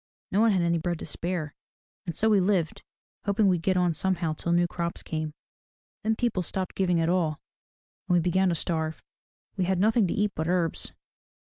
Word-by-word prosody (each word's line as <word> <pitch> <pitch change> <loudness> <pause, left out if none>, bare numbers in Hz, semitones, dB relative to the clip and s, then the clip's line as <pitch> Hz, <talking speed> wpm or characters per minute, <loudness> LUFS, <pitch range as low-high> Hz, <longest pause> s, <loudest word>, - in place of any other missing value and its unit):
No 205 - +3
one 225 -1 +5
had 185 -3 +2
any 170 0 +2
bread 175 +1 -1
to - - -7
spare. 165 -1 -3 0.5
And 170 - -3
so 220 - +2
we 210 -2 +5
lived, 185 -4 +1 0.4
hoping 205 0 +3
we'd 180 -3 +2
get 185 +2 +1
on 180 -2 +2
somehow 175 -1 0
till 170 +2 -3
new 175 0 +4
crops 170 0 -4
came. 155 -1 -4 0.7
Then 220 0 +1
people 230 -5 0
stopped 185 +1 -3
giving 180 -3 +1
at 165 - +1
all 170 -4 +1 0.7
and 180 - +3
we - - +5
began 180 +2 +2
to 170 - +1
starve. 160 -1 -2 0.5
We 185 - +1
had 190 +1 +1
nothing 215 +2 +3
to - - -1
eat 205 0 +1
but 160 +1 -2
herbs. 175 -2 0
180 Hz, 200 wpm, -27 LUFS, 165-190 Hz, 0.7 s, one